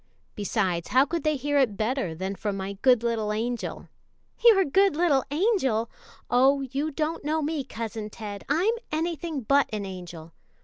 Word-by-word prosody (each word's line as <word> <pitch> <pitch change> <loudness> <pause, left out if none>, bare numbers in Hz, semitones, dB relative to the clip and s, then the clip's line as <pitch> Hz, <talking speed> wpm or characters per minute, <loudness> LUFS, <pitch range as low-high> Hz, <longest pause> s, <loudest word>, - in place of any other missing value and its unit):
Besides, 190 -5 -1
how 260 +2 +4
could 335 +2 -3
they 305 -1 +2
hear 290 +1 0
it 230 -7 +1
better 220 -7 -1
than 190 +4 -3
from 200 0 -3
my 195 +1 -4
good 250 -3 +4
little 225 -3 0
angel?" 230 +2 -3 0.6
"Your 425 -5 +7
good 385 +4 +3
little 300 -6 +3
angel! 285 - +1 0.4
Oh, 265 +3 +4
you 275 +3 -2
don't 310 +2 -2
know 310 +1 0
me, 300 -1 -1
Cousin 225 -4 -5
Ted! 205 -2 -7
I'm 350 +10 +2 0.2
anything 320 -2 -2
but 280 +5 +3
an 210 -2 -3
angel. 175 -4 -9
260 Hz, 165 wpm, -26 LUFS, 210-305 Hz, 0.6 s, Your